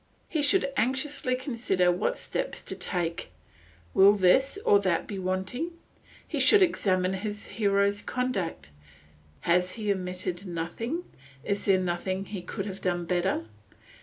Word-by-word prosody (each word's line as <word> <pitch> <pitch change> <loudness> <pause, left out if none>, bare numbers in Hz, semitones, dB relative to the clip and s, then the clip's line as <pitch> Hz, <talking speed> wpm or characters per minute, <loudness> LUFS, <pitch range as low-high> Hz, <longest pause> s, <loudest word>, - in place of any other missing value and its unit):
He 315 - -1
should 285 -1 +3
anxiously 260 +1 0
consider 230 -9 +1
what 485 - -1
steps - - -3
to - - -5
take; 170 -2 -2 0.6
will 195 +1 +7
this 210 - +3
or 200 - +6
that 185 -4 0
be 200 -2 -5
wanting. 190 - -2 0.5
He - - -3
should 415 -2 +7
examine 185 - +1
his 210 +2 -4
hero's 200 -1 +1
conduct; 195 - -3 0.7
has 180 +1 +2
he 210 -2 -1
omitted 185 0 -3
nothing; 180 - -3 0.4
is 200 +4 -2
there 195 -2 +5
nothing 185 +2 -2
he 195 -2 -6
could 195 +2 -5
have 195 -1 -6
done 175 -1 -1
better? 175 - 0
195 Hz, 135 wpm, -28 LUFS, 180-235 Hz, 0.7 s, will